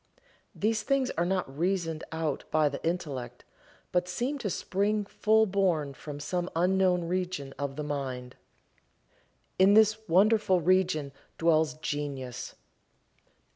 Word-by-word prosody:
These 215 +1 0
things 265 +2 +1
are 170 +1 -1
not 180 -8 -2
reasoned 170 -3 -1
out 160 -3 -2
by 155 -1 +3
the 140 - -7
intellect, 135 -8 -4 0.5
but 180 0 +1
seem 250 +10 -2
to 210 - -2
spring 205 +3 0
full 220 +2 +3
born 180 -8 0
from 145 +1 -8
some 175 +4 -2
unknown 180 0 +2
region 180 -6 -3
of 140 -1 -3
the 150 - -4
mind. 130 -4 -4 1.2
In 195 +2 +6
this 215 0 +5
wonderful 195 +1 +4
region 175 -4 +2 0.3
dwells 160 -2 +2
Genius. 135 -5 -5
175 Hz, 125 wpm, -29 LUFS, 145-195 Hz, 1.2 s, In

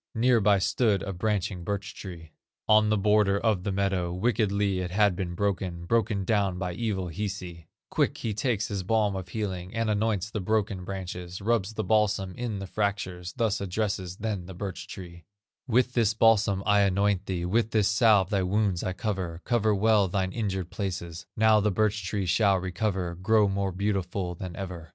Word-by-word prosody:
Near 120 0 +3
by 100 0 +4
stood 100 +1 +1
a 100 - -4
branching 95 -2 -1
birch 100 +1 -3
tree, 85 -5 -9 0.4
On 110 0 +5
the 110 - +3
border 105 -1 +3
of 105 -5 +1
the 100 - -1
meadow, 95 -3 0
Wickedly 100 -1 +1
it 90 -1 -3
had 100 0 +3
been 85 -2 -4
broken, 90 -3 -2
Broken 110 -1 +1
down 100 -3 +1
by 90 -1 -3
evil 95 -3 -2
Hisi; 90 -3 -5 0.2
Quick - - +1
he 110 - -3
takes 110 0 0
his 100 -2 -2
balm 105 +1 +1
of 95 -1 -6
healing, 95 -1 -4
And 115 -1 0
anoints 105 -1 0
the 105 - -3
broken 100 -2 0
branches, 90 -2 -6
Rubs 110 -1 0
the 110 - -1
balsam 105 -4 +1
in 120 -4 -3
the 95 - -5
fractures, 95 -3 -3
Thus 110 -4 0
addresses 95 -2 -2
then 100 -5 -3
the 95 - -9
birch 95 0 -6
tree: 85 -3 -10 0.4
"With 125 +1 +2
this 110 -3 +2
balsam 110 -3 +3
I 105 -1 +4
anoint 100 0 +2
thee, 90 -2 -2
With 110 +5 +1
this 110 -3 +2
salve 105 -3 +4
thy 100 -2 +2
wounds 95 -1 0
I 95 - -2
cover, 90 -5 -3
Cover 110 -3 +2
well 105 -1 +3
thine 95 0 -1
injured 95 -6 -3
places; 90 -4 -5
Now 110 0 +5
the 105 +1 +2
birch 105 +1 0
tree 95 +1 -2
shall 100 +2 +3
recover, 95 -1 -2
Grow 105 +4 +3
more 100 0 -1
beautiful 95 -1 -2
than 90 0 -7
ever." 90 -4 -7
100 Hz, 185 wpm, -27 LUFS, 90-110 Hz, 0.4 s, On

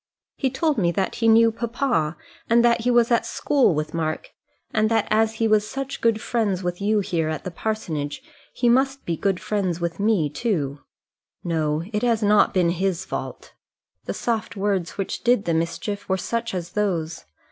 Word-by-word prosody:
He 265 - 0
told 290 +1 0
me 170 -3 +2
that 195 0 -1
he 230 - +3
knew 225 0 +6
papa, 230 - -1 0.3
and 235 +1 +5
that 235 0 +3
he 245 - 0
was 240 -1 +4
at 235 - +3
school 270 - +2
with 155 0 -3
Mark, 155 -1 -3 0.4
and 215 0 +2
that 225 -2 +1
as 220 +1 +2
he 225 0 +1
was 215 -1 +2
such 275 0 -5
good 230 -2 +2
friends 210 -5 -1
with 175 +1 -3
you 210 +1 +2
here 170 -5 -1
at 155 - -4
the 185 - -5
parsonage, 165 -8 -3 0.3
he 245 - 0
must 265 +3 +2
be 170 - -1
good 190 +2 0
friends 190 -5 -1
with 170 0 -3
me 200 -7 +2
too. 145 - -2 0.6
No; 155 -2 0
it 210 - 0
has 230 -3 +1
not 210 0 +4
been 175 -3 +2
his 185 0 -1
fault. - - -6 0.5
The - - -3
soft 230 -2 -2
words 195 -4 -1
which 195 - -3
did 240 -3 +3
the 170 - +1
mischief 170 +6 -2
were 190 - +2
such 230 +1 -3
as 175 -1 -4
those. 175 -6 -2
205 Hz, 190 wpm, -23 LUFS, 170-230 Hz, 0.6 s, knew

